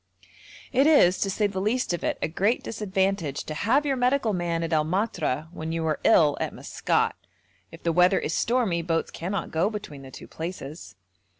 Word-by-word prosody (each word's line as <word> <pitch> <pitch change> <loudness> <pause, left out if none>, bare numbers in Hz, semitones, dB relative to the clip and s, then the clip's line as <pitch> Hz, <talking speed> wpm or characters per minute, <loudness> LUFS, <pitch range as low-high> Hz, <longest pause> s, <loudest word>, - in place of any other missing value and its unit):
It 270 +3 +4
is, 190 - +5
to 195 - 0
say 210 +2 0
the 195 -2 -2
least 220 0 0
of 175 - -4
it, - - -1
a - - +2
great 200 +9 0
disadvantage 190 -8 -1
to 155 - -6
have 245 - +1
your 275 -2 +1
medical 250 -2 +1
man 170 -2 -1
at 165 0 -2
El 155 -1 +3
Matra 160 - -1
when 160 -1 -5
you 165 0 -2
are 155 -1 0
ill 150 -3 +5
at - - -3
Maskat; - - 0 0.6
if 165 - -13
the 170 - +1
weather 180 +3 +4
is 160 - -2
stormy 225 -7 +1
boats 165 -1 -1
cannot 185 +2 -4
go 165 +5 +1
between 200 -10 -7
the 135 - -11
two - - -11
places. 160 - -7
180 Hz, 195 wpm, -26 LUFS, 160-210 Hz, 0.6 s, is